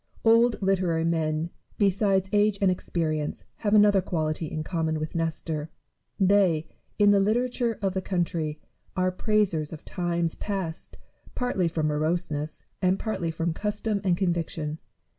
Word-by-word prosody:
Old 230 +1 +5
literary 185 -4 +2
men, 160 0 0 0.3
beside 195 -1 +2
age 205 0 +3
and 195 -2 +4
experience, 155 -4 -2
have 210 -1 +1
another 205 -2 +6
quality 160 -3 -2
in 155 +1 -4
common 160 -2 -1
with 155 +1 -4
Nestor: 160 -2 -2 0.5
they, 190 -5 +3 0.3
in 205 -1 +6
the 200 - +5
literature 235 +2 +1
of 195 -1 +1
the 190 - -1
coun 185 -2 0
try, 155 -3 -3 0.4
are 185 0 +2
praisers 185 -6 +1
of 160 - -9
times 170 -2 -1
past, 190 -6 -5 0.4
partly 245 -8 0
from 160 -2 -1
moroseness, 155 0 -1 0.2
and 185 0 +3
partly 195 -7 -2
from 165 +1 -1
custom 210 +2 -2
and 180 -3 +2
conviction. 165 -4 -2
175 Hz, 140 wpm, -27 LUFS, 160-200 Hz, 0.5 s, another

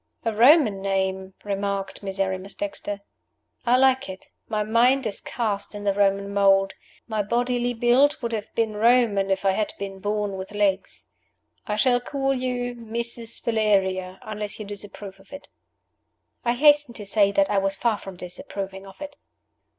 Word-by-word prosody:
"A 225 - +1
Roman 235 - +5
name," 190 -1 -1
remarked 200 -1 -3
Miserrimus 195 0 -2
Dexter. 250 -10 -4 0.7
"I 245 +1 +5
like 265 -2 +3
it. 190 0 -9 0.2
My 215 -2 0
mind 240 +5 +3
is 205 -2 -1
cast 210 -3 -2
in 205 - -6
the 200 -1 +2
Roman 200 0 +1
mold. 195 -1 +4 0.3
My 220 -2 -1
bodily 245 +3 0
build 245 +5 +4
would 235 -1 -3
have 215 -2 -4
been 225 -2 0
Roman 220 -3 +3
if 195 0 0
I 195 - +5
had 210 +2 -1
been 195 -1 -6
born 205 0 -2
with 190 +2 -7
legs. 200 -2 0 0.6
I 210 - -1
shall 245 +3 +3
call 270 +1 -1
you 250 -1 -2
Mrs. 235 0 -4
Valeria, 190 -5 +1
unless 210 -1 -4
you 215 - -5
disapprove 200 -1 -9
of 195 - -21
it." 280 0 -10 0.9
I 235 -1 +2
hastened 290 -1 +4
to 210 - -4
say 200 0 +3
that 195 -1 +2
I 200 - +3
was 195 0 0
far 220 -1 0
from 195 -1 -9
disapproving 190 0 -7
of 195 - -15
it. 290 0 -8
210 Hz, 165 wpm, -24 LUFS, 195-240 Hz, 0.9 s, Roman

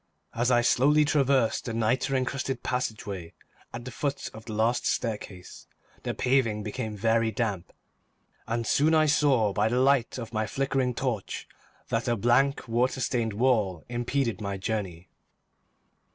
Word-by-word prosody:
As 120 +2 +1
I 120 -1 +4
slowly 145 +5 +4
traversed 135 -5 +2
the 115 -3 -3
nitre 125 +4 +1
encrusted 130 0 -2
passageway 105 -8 -3 0.4
at 120 0 -7
the 125 - -6
foot 140 +1 -3
of 110 0 -11
the 110 - -6
last 115 +3 +1
staircase, 105 -5 -4 0.3
the - - -3
paving 125 -5 +1
became 105 0 -4
very 115 +2 +2
damp, 105 -5 -2 0.8
and 115 0 -1
soon 155 +7 +3
I 155 0 +5
saw 135 -8 +3
by 105 +2 +2
the 125 +2 +1
light 135 -2 +2
of 115 -2 -7
my 110 0 -1
flickering 135 0 -1
torch 120 -7 -3 0.4
that 115 +2 -1
a 120 - +2
blank, 125 +6 +2
water 125 +3 +1
stained 120 -4 -1
wall 105 -7 +1
impeded 120 -1 -1
my 100 -1 -3
journey. 95 -4 -4
120 Hz, 150 wpm, -27 LUFS, 110-130 Hz, 0.8 s, I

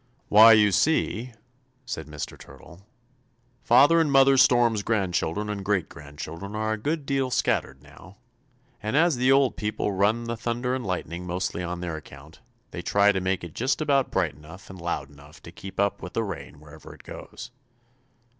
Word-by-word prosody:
"Why, 110 +2 +8
you 105 -1 +5
see," 120 - +1 0.5
said 105 -11 -6
Mr. 75 -1 -7
Turtle, 85 +2 -15 0.8
"Father 145 +8 +5
and 155 -3 0
Mother 135 0 +5
Storm's 120 -4 +4
grandchildren 100 -2 -1
and 105 -2 -4
great 95 -3 0
grandchildren 80 +7 -9
are 110 0 -1
a - - -3
good 150 +5 -2
deal 135 -2 0
scattered 65 - -1
now, 95 +2 -16 0.6
and 110 +6 -1
as 165 -3 +3
the 130 +2 +3
old 135 -1 +3
people 105 -1 -2
run 100 +4 +1
the 115 0 -4
thunder 120 +2 -2
and 130 -1 -3
lightning 90 -2 -4
mostly 90 0 -3
on 90 0 -5
their 85 -3 -4
account, 75 +1 -14 0.3
they - - -6
try 100 0 +3
to 95 -2 -2
make 95 0 -1
it 85 -3 -8
just 130 +4 -1
about 140 -4 +1
bright 90 -5 0
enough 80 +8 -13
and 95 -2 -11
loud 85 -5 -4
enough 75 +1 -16
to - - -11
keep 95 0 -10
up 100 0 0
with 90 - -8
the 115 - 0
rain 100 -7 -7
wherever 75 +1 -13
it - - -18
goes." 125 - -10
100 Hz, 180 wpm, -25 LUFS, 85-120 Hz, 0.8 s, Why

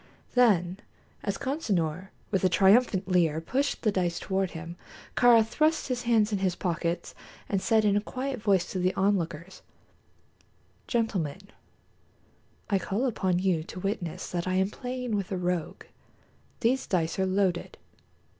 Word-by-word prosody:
Then, 195 -7 +3 0.4
as 200 -2 -2
Consinor, 195 - -1 0.2
with 195 -3 +1
a 185 - +4
triumphant 195 +3 +4
leer, 170 -4 +2
pushed 265 - -1
the 215 - +3
dice 175 -3 0
toward 190 -1 -1
him, 170 +1 -8 0.4
Kāra 235 -2 +6
thrust 310 +6 +1
his 250 -1 -1
hands 220 -2 +3
in 205 - 0
his 185 -2 0
pockets 170 -1 -2 0.3
and 195 -2 0
said 220 0 +3
in 205 -1 +3
a 205 - +2
quiet 255 +2 -4
voice 195 -4 +3
to 185 - -2
the 185 +1 +1
onlookers: 190 -3 -1 1.3
"Gentlemen, 195 - -1 1.3
I 200 -3 +1
call 200 +7 -1
upon 190 -7 0
you 180 -3 +1
to 180 - -8
witness 185 -4 -3
that 175 0 -2
I 185 - 0
am 190 +2 +1
playing 250 -2 -4
with 200 0 -3
a 190 - -1
rogue. 180 -2 -2 0.8
These 255 +3 +1
dice 165 -1 0
are 190 - +2
loaded." 185 -2 0
190 Hz, 150 wpm, -28 LUFS, 180-225 Hz, 1.3 s, Kāra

